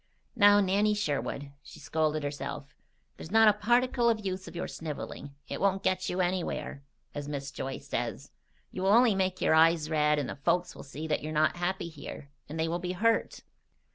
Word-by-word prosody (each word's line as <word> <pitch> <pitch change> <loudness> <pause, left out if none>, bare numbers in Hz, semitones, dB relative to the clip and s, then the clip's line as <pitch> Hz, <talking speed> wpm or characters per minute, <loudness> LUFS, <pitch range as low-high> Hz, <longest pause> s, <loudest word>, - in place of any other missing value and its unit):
"Now, 205 -2 +6
Nanny 205 +2 +2
Sherwood!" 145 -6 -2
she - - -13
scolded 155 +1 -1
herself, 145 0 -5 0.4
"there's - - -9
not 220 +2 +6
a 210 - +7
particle 240 +3 +2
of 215 -3 -1
use 185 0 -3
of - - -10
your 175 - -3
sniveling. 145 -2 -7
It - - -5
won't 195 -1 +1
'get 185 0 0
you 180 +1 0
anywhere,' 175 -5 -2 0.3
as 145 -1 -5
Mrs. 140 -2 -5
Joyce 135 +2 -6
says. - - -3 0.4
You'll 185 +1 -2
only 230 +2 +6
make 185 -1 -1
your - - +3
eyes 160 0 +4
red, 150 -1 +3
and 145 -3 -1
the - - -5
folks 175 +5 0
will - - -9
see 145 +3 -7
that 155 -1 -1
you're 155 - -5
not 155 +2 +2
happy 175 0 -2
here, 145 -2 -9 0.2
and 160 +2 -5
they 160 - +1
will 170 +2 -2
be 180 +1 -3
hurt. 225 +4 +1
175 Hz, 195 wpm, -29 LUFS, 150-195 Hz, 0.4 s, a